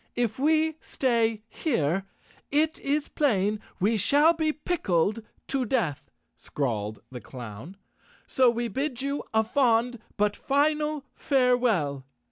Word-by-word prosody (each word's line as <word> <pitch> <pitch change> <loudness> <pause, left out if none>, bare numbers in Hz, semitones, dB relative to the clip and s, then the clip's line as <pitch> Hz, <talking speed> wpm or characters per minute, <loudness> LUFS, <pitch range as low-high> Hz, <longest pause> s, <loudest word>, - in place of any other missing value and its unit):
"If 240 -1 -1
we 315 +2 +2
stay 230 -4 0
here 195 - -1 0.4
it 310 +2 +1
is 285 +1 -1
plain 210 -7 +1 0.2
we 215 +4 +2
shall 290 - +5
be 315 -2 0
pickled 220 - 0 0.3
to 270 -1 0
death," 210 - -1 0.3
scrawled 110 -6 -3
the 125 -2 -7
clown, 125 - -9 0.5
"so 255 -2 +4
we 235 0 -1
bid 265 +3 -3
you 280 +1 -2
a 220 0 +3
fond 240 0 +2 0.2
but 205 0 +1
final 300 +1 0
farewell." 240 - +1
240 Hz, 120 wpm, -27 LUFS, 195-285 Hz, 0.5 s, shall